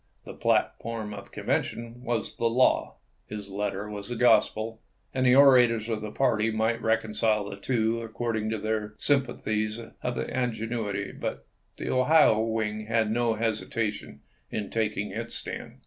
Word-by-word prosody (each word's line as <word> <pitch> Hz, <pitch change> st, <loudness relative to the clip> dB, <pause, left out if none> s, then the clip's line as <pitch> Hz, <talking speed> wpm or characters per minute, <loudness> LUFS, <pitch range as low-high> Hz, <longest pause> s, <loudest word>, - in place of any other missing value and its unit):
The -, -, -8 dB
platform 110 Hz, -2 st, 0 dB
of 100 Hz, -1 st, -8 dB
the -, -, -21 dB
convention 115 Hz, +1 st, -2 dB
was 120 Hz, -3 st, -2 dB
the 115 Hz, -, +2 dB
law, 125 Hz, +3 st, +2 dB, 0.3 s
his 105 Hz, -1 st, -7 dB
letter 100 Hz, 0 st, -2 dB
was 105 Hz, +1 st, -7 dB
the 120 Hz, -, -3 dB
gospel, 115 Hz, -1 st, +3 dB, 0.3 s
and 130 Hz, -1 st, +2 dB
the 125 Hz, -, +6 dB
orators 120 Hz, -5 st, +6 dB
of 110 Hz, -2 st, -1 dB
the 105 Hz, -, -4 dB
party 115 Hz, -2 st, +1 dB
might 110 Hz, +1 st, 0 dB
reconcile 110 Hz, -1 st, +1 dB
the 100 Hz, -, -6 dB
two 115 Hz, +2 st, 0 dB
according 110 Hz, -1 st, -2 dB
to 110 Hz, -, -1 dB
their 105 Hz, 0 st, -2 dB
sympathies 110 Hz, -6 st, 0 dB
or 115 Hz, -, -10 dB
their 125 Hz, -, -2 dB
ingenuity. 115 Hz, -4 st, -2 dB
The -, -, -7 dB
Ohio 130 Hz, -3 st, +5 dB
wing 110 Hz, -1 st, -1 dB
had 115 Hz, -1 st, +1 dB
no 115 Hz, 0 st, +1 dB
hesitation 115 Hz, 0 st, -2 dB, 0.3 s
in 105 Hz, -2 st, -4 dB
taking 105 Hz, -2 st, -1 dB
its 115 Hz, +3 st, -4 dB
stand. -, -, -6 dB
110 Hz, 150 wpm, -27 LUFS, 105-120 Hz, 0.3 s, the